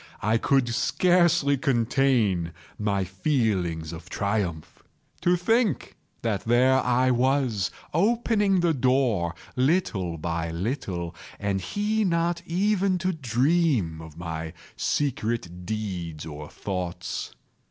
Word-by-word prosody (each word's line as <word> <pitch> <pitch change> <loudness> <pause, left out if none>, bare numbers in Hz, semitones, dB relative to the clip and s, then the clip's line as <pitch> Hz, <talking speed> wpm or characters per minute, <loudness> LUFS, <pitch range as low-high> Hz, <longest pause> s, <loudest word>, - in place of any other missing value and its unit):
I 110 +2 +2
could 135 -1 +2
scarcely 170 +2 +3
contain 120 - +1 0.3
my 100 -2 0
feelings 95 - -1
of 85 +2 -9
triumph. 100 -7 -2 0.4
To 175 - +4
think 210 - +1 0.3
that 110 -4 -1
there 130 +3 +4
I 125 +1 +3
was, 125 -6 +1 0.2
opening 210 -2 +2
the 170 -2 +3
door, 125 - +1 0.2
little 125 - +1
by 85 +1 -2
little, 85 - -3 0.2
and 100 -1 -1
he 210 - 0
not 170 -2 +1
even 195 +1 +2
to 185 +1 -1
dream 130 - +1
of 80 -1 -11
my 80 -1 -5 0.2
secret 110 - -2
deeds 90 -7 -4
or 75 -1 -8
thoughts. 90 -2 -4
115 Hz, 110 wpm, -26 LUFS, -, 0.4 s, To